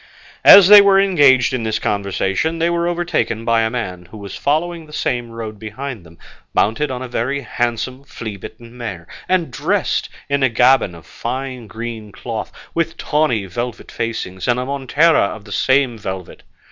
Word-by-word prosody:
As 200 -2 +10
they 205 0 +10
were 200 -1 +5
engaged 145 -11 +4
in 130 - -1
this 110 -1 -1
conversation 100 - -1
they 165 +1 +1
were 170 0 0
overtaken 170 -10 -1
by 115 -1 +3
a 110 - +1
man 90 -7 -5
who 110 - -11
was 100 -2 -8
following 160 +2 -1
the 150 - -15
same 120 -5 -2
road 110 -2 -7
behind 110 0 -7
them, 80 0 -17 0.4
mounted 115 +8 +1
on 130 -1 -4
a - - -5
very 130 +4 -2
handsome 120 +2 -3
flea 110 -6 -7
bitten 115 +4 -12
mare, 100 -9 -7 0.2
and 185 -3 +1
dressed 180 +7 -1 0.2
in 140 0 0
a 130 - +4
gaban 120 -5 +3
of 80 - -14
fine 130 -3 -5
green 110 0 -7
cloth, 110 +1 -6 0.2
with 165 0 -1
tawny 150 -9 0
velvet 120 +6 -5
facings, 110 -5 -4
and 120 0 +2
a 125 - -3
montera 140 -2 +2
of 105 - -13
the 100 - -12
same 130 +2 +1
velvet. 95 -3 -7
120 Hz, 175 wpm, -19 LUFS, 110-145 Hz, 0.4 s, As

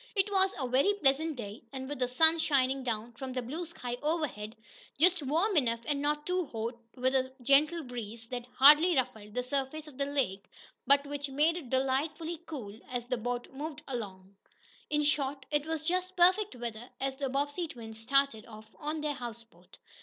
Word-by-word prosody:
It 405 +1 +2
was 385 -1 +4
a 260 - -1
very 275 +12 +3
pleasant 310 -2 +2
day, 210 -3 -7
and 265 -1 -6
with 290 -1 -5
the 250 - +2
sun 320 +6 +6
shining 270 -3 +2
down 230 -1 -2
from 255 +1 -7
a - - +1
blue 320 +8 -5
sky 245 -7 -5
overhead, 295 -9 -2 0.4
just 355 +3 +5
warm 330 +9 +1
enough, 235 -6 +2
and 280 +2 0
not 295 +1 0
too 360 -2 0
hot, 225 0 -3 0.2
with 260 0 +1
a 260 -1 +1
gentle 300 +6 +4
breeze 235 -3 -7
that 245 -1 -5
hardly 300 +6 +8
ruffled 220 -5 -2
the 250 - 0
surface 275 +4 -2
of 290 -3 -13
the 280 - 0
lake, 225 -10 -1 0.4
but 280 +1 +5
which 285 0 -4
made 300 +5 +2
it 315 -8 -7
delightfully 300 +6 -1
cool 230 -10 -6
as 245 -1 -3
the 250 0 -1
boat 245 +1 -3
moved 295 +2 -6
slowly 255 -3 -2
along. 190 -2 -9 0.5
In 300 0 +1
short, 280 -2 0
it 295 +1 +1
was 320 -1 -2
just 365 +1 0
perfect 370 +2 +4
weather, 235 0 -6
as 270 0 -2
the 275 -1 -2
Bobbsey 290 +5 -1
twins 225 -6 -9
started 270 -1 +1
off 215 -1 -11
on 305 0 -3
their 300 -1 -1
houseboat. 230 -8 -10
275 Hz, 190 wpm, -31 LUFS, 245-305 Hz, 0.5 s, hardly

